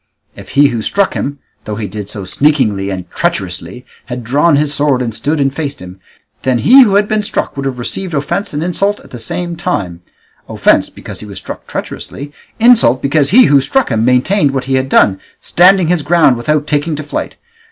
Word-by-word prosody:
If -, -, -12 dB
he 145 Hz, 0 st, +6 dB
who 115 Hz, -, -3 dB
struck 200 Hz, -, +1 dB
him, 140 Hz, +1 st, -4 dB, 0.3 s
though 105 Hz, -, -4 dB
he 110 Hz, 0 st, -4 dB
did 105 Hz, 0 st, -7 dB
so 100 Hz, -2 st, -7 dB
sneakingly 105 Hz, -6 st, +1 dB
and 95 Hz, -2 st, -5 dB
treacherously, 95 Hz, -, -3 dB, 0.2 s
had 125 Hz, 0 st, -6 dB
drawn 145 Hz, +7 st, +2 dB
his 145 Hz, 0 st, +1 dB
sword 145 Hz, -3 st, +1 dB
and 120 Hz, -3 st, -3 dB
stood 150 Hz, +7 st, -2 dB
and 135 Hz, -1 st, +1 dB
faced 145 Hz, -1 st, -4 dB
him, 90 Hz, +1 st, -11 dB, 0.4 s
then 130 Hz, -2 st, +1 dB
he 255 Hz, -, +6 dB
who 210 Hz, -6 st, +4 dB
had 205 Hz, 0 st, +3 dB
been 215 Hz, 0 st, 0 dB
struck 205 Hz, -, -2 dB
would 140 Hz, -1 st, -3 dB
have 130 Hz, -2 st, -4 dB
received 170 Hz, +8 st, -3 dB
offence 170 Hz, +8 st, -2 dB
and 150 Hz, +2 st, -3 dB
insult 195 Hz, +4 st, -1 dB
at -, -, -18 dB
the 125 Hz, -, -8 dB
same 170 Hz, +9 st, -4 dB
time; 100 Hz, -, -3 dB, 0.5 s
offence -, -, +2 dB
because -, -, -10 dB
he -, -, -9 dB
was -, -, -9 dB
struck -, -, -8 dB
treacherously, 145 Hz, +1 st, -7 dB, 0.3 s
insult 225 Hz, -, +5 dB
because 140 Hz, 0 st, +2 dB
he 250 Hz, +7 st, +6 dB
who 140 Hz, -1 st, +4 dB
struck 265 Hz, -, 0 dB
him 110 Hz, -1 st, +1 dB
maintained 135 Hz, -, +2 dB
what 130 Hz, -, -2 dB
he 135 Hz, -, -2 dB
had 130 Hz, 0 st, 0 dB
done, 95 Hz, -6 st, +3 dB, 0.2 s
standing 180 Hz, -1 st, +4 dB
his 175 Hz, -2 st, +1 dB
ground 150 Hz, -3 st, +3 dB
without 145 Hz, +5 st, -1 dB
taking 150 Hz, +2 st, -1 dB
to 155 Hz, -, -6 dB
flight. 145 Hz, -, -5 dB
140 Hz, 205 wpm, -14 LUFS, 120-170 Hz, 0.5 s, he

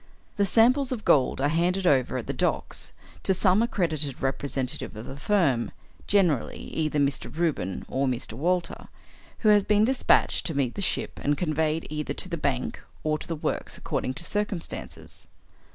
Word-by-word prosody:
The 200 Hz, -1 st, +3 dB
samples 250 Hz, +6 st, +4 dB
of 235 Hz, -5 st, -4 dB
gold 135 Hz, -3 st, +3 dB
are 140 Hz, -, +3 dB
handed 175 Hz, +5 st, +1 dB
over 130 Hz, -5 st, +3 dB
at 120 Hz, -, -4 dB
the -, -, -3 dB
docks -, -, -1 dB, 0.3 s
to 190 Hz, -, +1 dB
some 190 Hz, +2 st, +3 dB
accredited 155 Hz, -, -1 dB
representative 135 Hz, -2 st, -2 dB
of 110 Hz, +2 st, -7 dB
the 135 Hz, -, -7 dB
firm 140 Hz, -, +1 dB, 0.4 s
generally 180 Hz, -, +2 dB
either 155 Hz, -2 st, -2 dB
Mr. 140 Hz, -1 st, 0 dB
Reuben 155 Hz, -, -1 dB
or 135 Hz, +1 st, 0 dB
Mr. 125 Hz, -3 st, -3 dB
Walter 175 Hz, +8 st, -1 dB, 0.5 s
who 215 Hz, -, +4 dB
has 205 Hz, -1 st, +6 dB
been 210 Hz, +1 st, +3 dB
despatched 260 Hz, +1 st, +3 dB
to 160 Hz, -5 st, -2 dB
meet 130 Hz, -4 st, +1 dB
the -, -, -5 dB
ship, -, -, 0 dB
and 145 Hz, 0 st, +1 dB
conveyed 160 Hz, -1 st, 0 dB
either 150 Hz, -1 st, -3 dB
to 185 Hz, -, -2 dB
the 170 Hz, -, -2 dB
bank 140 Hz, -5 st, -2 dB, 0.2 s
or 155 Hz, 0 st, 0 dB
to -, -, -8 dB
the 165 Hz, -, -2 dB
works 150 Hz, -, -3 dB
according 130 Hz, -, -3 dB
to 165 Hz, -, -6 dB
circumstances. 205 Hz, -2 st, -5 dB
160 Hz, 170 wpm, -26 LUFS, 140-195 Hz, 0.5 s, has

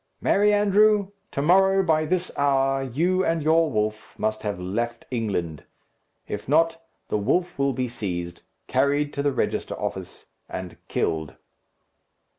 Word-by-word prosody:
"Merry 210 Hz, +1 st, +3 dB
andrew! 205 Hz, 0 st, +4 dB, 0.2 s
to 140 Hz, -, -2 dB
morrow, 190 Hz, +3 st, +4 dB
by 155 Hz, -3 st, +2 dB
this 180 Hz, +2 st, -1 dB
hour, 135 Hz, -1 st, +2 dB
you 170 Hz, +9 st, +1 dB
and 165 Hz, -3 st, 0 dB
your 160 Hz, +1 st, +3 dB
wolf 110 Hz, -3 st, -3 dB
must 110 Hz, 0 st, -1 dB
have 105 Hz, -4 st, -3 dB
left 115 Hz, +6 st, -3 dB
England. 95 Hz, -, -2 dB, 0.6 s
If 105 Hz, +4 st, -5 dB
not, 165 Hz, +2 st, +3 dB, 0.3 s
the 105 Hz, -, 0 dB
wolf 175 Hz, -, 0 dB
will 140 Hz, 0 st, +2 dB
be 125 Hz, +1 st, -1 dB
seized, 90 Hz, -7 st, -5 dB, 0.2 s
carried 145 Hz, +3 st, +1 dB
to 140 Hz, -, -2 dB
the 145 Hz, 0 st, +1 dB
register 130 Hz, -, -2 dB
office, -, -, -5 dB, 0.2 s
and 90 Hz, -1 st, -6 dB
killed." 80 Hz, -4 st, -2 dB
140 Hz, 140 wpm, -24 LUFS, 110-165 Hz, 0.6 s, andrew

